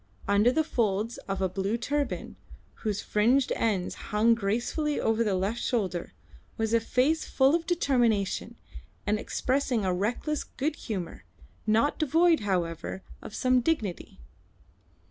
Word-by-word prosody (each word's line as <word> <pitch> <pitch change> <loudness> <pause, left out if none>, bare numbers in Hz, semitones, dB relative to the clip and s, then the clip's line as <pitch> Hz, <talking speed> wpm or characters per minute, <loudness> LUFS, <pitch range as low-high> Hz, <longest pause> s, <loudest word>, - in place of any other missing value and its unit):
Under 205 +4 +4
the 315 +4 +2
folds 225 -5 -1
of 195 -1 -2
a - - +3
blue 195 +4 -1
turban, 285 +4 -2 0.5
whose 210 -3 -1
fringed 245 +6 +2
ends 200 -5 0 0.2
hung 220 +3 +4
gracefully 235 +8 -1
over 225 +1 +2
the 205 -4 +1
left 200 +6 -1
shoulder, 185 -8 -1 0.4
was 225 -1 -1
a 230 - +5
face 260 +7 +1
full 270 +1 +3
of 335 0 0
determination 240 - +1 0.5
and 210 0 +1
expressing 255 -3 0
a 185 - +1
reckless 240 - -1
good 295 +3 -3
humour, 195 -11 -5 0.4
not 225 +7 +2
devoid, 325 +2 +4
however, 185 -2 -2 0.2
of 215 - -9
some 255 -1 +3
dignity. 220 - -2
230 Hz, 135 wpm, -28 LUFS, 200-270 Hz, 0.5 s, a